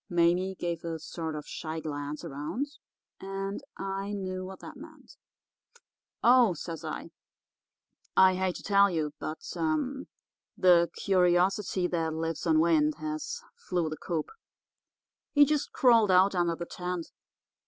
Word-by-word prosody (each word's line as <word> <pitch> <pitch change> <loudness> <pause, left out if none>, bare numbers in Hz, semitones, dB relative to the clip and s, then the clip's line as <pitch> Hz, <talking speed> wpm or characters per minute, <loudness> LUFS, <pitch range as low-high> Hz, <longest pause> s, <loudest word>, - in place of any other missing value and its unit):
"Mame 175 +2 +2
gave 170 -2 -3
a 165 -1 -3
sort 160 0 -5
of 150 - -7
sly 160 -1 -5
glance 145 -1 -5
around, 150 - -3 0.5
and 195 +1 -4 0.2
I 195 +1 -3
knew 185 -2 -4
what 190 +1 -8
that - - -9
meant. - - -14 1.1
"'Oh,' 240 -6 +6
says 165 +1 -6
I, 160 +1 -6 1.1
'I 190 0 +7
hate 185 -1 -1
to - - -8
tell 200 0 +5
you; 155 -4 -2
but 155 - -5 1.2
the 175 -2 +5
curiosity 185 +1 +2
that 165 -3 -1
lives 165 +1 -3
on 160 -1 +4
wind 300 - +3
has 315 +11 -5
flew 180 - -2
the 155 - -5
coop. 165 -1 -3 1.0
He 290 -1 +7
just 300 0 -1
crawled 230 -5 +5
out 185 +2 +5
under 175 -2 +1
the 170 - -5
tent. 180 -1 -5
180 Hz, 135 wpm, -29 LUFS, 165-195 Hz, 1.2 s, I